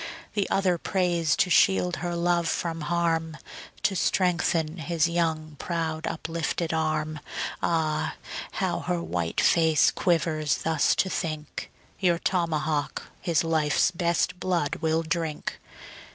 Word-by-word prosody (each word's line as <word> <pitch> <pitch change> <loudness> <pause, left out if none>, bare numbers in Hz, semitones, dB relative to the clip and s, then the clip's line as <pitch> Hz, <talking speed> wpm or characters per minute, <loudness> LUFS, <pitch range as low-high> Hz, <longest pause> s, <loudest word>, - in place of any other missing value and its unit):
The 200 -2 0
other 185 -3 +2
prays 175 -5 +1
to 195 -4 +1
shield 95 - +4
her 175 +3 -3
love 170 0 +1
from 165 -1 -2
harm, 165 0 0 0.5
To 195 - +2
strengthen 170 -3 +1
his 165 0 +1
young, 160 -3 -1
proud 160 -2 -2
uplifted 165 0 -2
arm. 155 -1 -1 0.4
Ah, 155 -2 0 0.4
how - - -1
her 85 -1 -2
white 85 0 -2
face 160 -3 +4
quivers 160 -4 0
thus 160 -2 +2
to - - +2
think, 155 -3 -4 0.3
Your 175 -3 +3
tomahawk 160 -5 -1
his 170 -2 +1
life's 160 0 +2
best 170 +1 0
blood 175 -6 0
will 160 0 +1
drink. 160 -2 -3
165 Hz, 125 wpm, -26 LUFS, 155-175 Hz, 0.5 s, shield